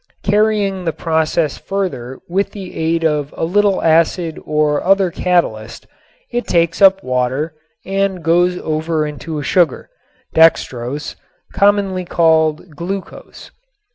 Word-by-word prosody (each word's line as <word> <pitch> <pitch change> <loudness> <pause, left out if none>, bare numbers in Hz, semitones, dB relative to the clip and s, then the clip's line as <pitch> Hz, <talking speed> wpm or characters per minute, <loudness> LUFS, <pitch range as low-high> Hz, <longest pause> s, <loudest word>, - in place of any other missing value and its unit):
Carrying 205 -2 +1
the 165 - -1
process 160 -1 -1
further 175 -11 -4
with 195 +3 -1
the 190 -3 -9
aid 165 +1 0
of 150 -2 0
a - - -1
little 200 +3 +1
acid 165 +1 +1
or 150 -1 +1
other 195 -1 +3
catalyst 115 -13 -1 0.5
it 240 0 -2
takes 170 0 +1
up 195 0 +6
water 130 +5 -1 0.3
and 195 -2 -1
goes 175 +2 +2
over 155 -1 -1
into 150 +2 -6
a 145 - -4
sugar, 175 - +1 0.4
dextrose, 145 -4 +1 0.4
commonly 200 -2 +2
called 160 -1 +1
"glucose." 185 +5 -7
165 Hz, 120 wpm, -17 LUFS, 155-190 Hz, 0.5 s, up